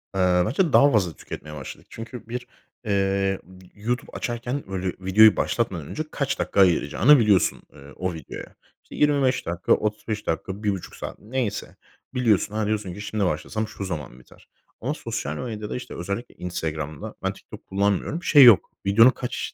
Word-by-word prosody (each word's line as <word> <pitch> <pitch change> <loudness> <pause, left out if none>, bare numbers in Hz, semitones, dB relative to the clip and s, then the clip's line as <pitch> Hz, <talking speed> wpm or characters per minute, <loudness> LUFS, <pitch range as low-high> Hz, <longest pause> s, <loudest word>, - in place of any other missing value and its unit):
Eee, 90 -1 +3
bence 155 - +1
daha 145 +1 +7
fazla 95 - +2
tüketmeye 75 +1 -9
başladık. 70 -3 -9
Çünkü 115 +1 -9
bir, 125 +1 -5 0.4
eee, 95 -1 +1 0.4
YouTube 120 +4 -3
açarken, 120 +3 -3
böyle, 95 -1 -3
videoyu 105 +4 +6
başlatmadan 95 -11 -1
önce 155 - -3
kaç 135 -2 -2
dakika - - -1
ayıracağını 95 - +5
biliyorsun, 105 -5 +3
eee, 70 +1 -14
o 95 -1 -2
videoya. 80 -4 -9 0.3
İşte, - - -12
25 140 -3 +2
dakika, 85 +1 +1
35 105 0 -2
dakika, 95 +5 -3
1,5 100 -3 -2
saat, - - -7
neyse. 115 -2 -3 0.4
Biliyorsun, 110 -4 +2
ha, 110 -1 0
diyorsun 105 -4 -2
ki 105 - -8
"Şimdi 105 -1 -1
başlasam 110 +7 -2
şu 100 - -7
zaman 75 -8 -6
biter." 60 - -20 0.3
Ama - - -1
sosyal 75 +2 -4
medyada, 110 -4 -5
işte, 125 - -7
özellikle 100 +7 -5
Instagram'da 80 -4 -5
Ben - - 0
TikTok - - -13
kullanmıyorum. 100 - 0
Şey 145 -6 +7
yok, 120 -6 +7
videonun 115 +5 +7
kaç 125 -1 -4
105 Hz, 160 wpm, -24 LUFS, 90-120 Hz, 0.4 s, daha